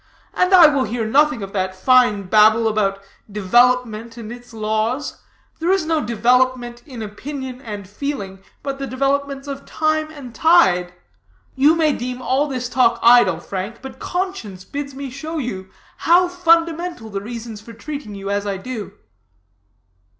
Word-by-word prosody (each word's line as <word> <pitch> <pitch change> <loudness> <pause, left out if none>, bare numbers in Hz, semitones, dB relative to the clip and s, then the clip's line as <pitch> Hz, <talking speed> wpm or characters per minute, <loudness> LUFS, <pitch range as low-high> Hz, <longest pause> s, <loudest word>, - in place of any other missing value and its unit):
I 365 -2 +6
will 285 -3 +1
hear 225 +1 -3
nothing 285 0 +2
of 195 - -8
that 185 -1 -2
fine 245 -1 +3
babble 215 +3 +4
about 200 -2 0 0.3
development 230 +2 +2
and 225 -1 -8
its 245 0 -11
laws; 220 +5 -2 0.4
there 330 +2 -1
is 385 -4 +1
no 320 -1 0
development 240 +2 +1
in 245 -5 -7
opinion 260 +4 -7
and 205 -5 -7
feeling 205 -4 -5 0.2
but 275 -1 -4
the 275 - -4
developments 275 +2 -1
of 275 0 -6
time 310 0 -1
and 280 -6 -10
tide. 185 - +3 0.6
You 290 +4 +4
may 315 -3 +2
deem 250 0 -5
all 265 +3 0
this 255 -3 -3
talk 240 -2 +2
idle, 230 -8 +6
Frank; 195 +7 -6
but 265 - -9
conscience 355 - -4
bids 280 +2 -6
me 275 -1 -6
show 310 +5 -6
you 190 -9 -5 0.3
how 355 +2 +4
fundamental 335 -7 +1
the 195 0 -3
reasons 225 -1 -7
for 230 - -12
treating 250 -2 -7
you 195 0 -5
as 205 0 -1
I 200 -1 -2
do." 210 -1 -7
245 Hz, 155 wpm, -20 LUFS, 215-285 Hz, 0.6 s, I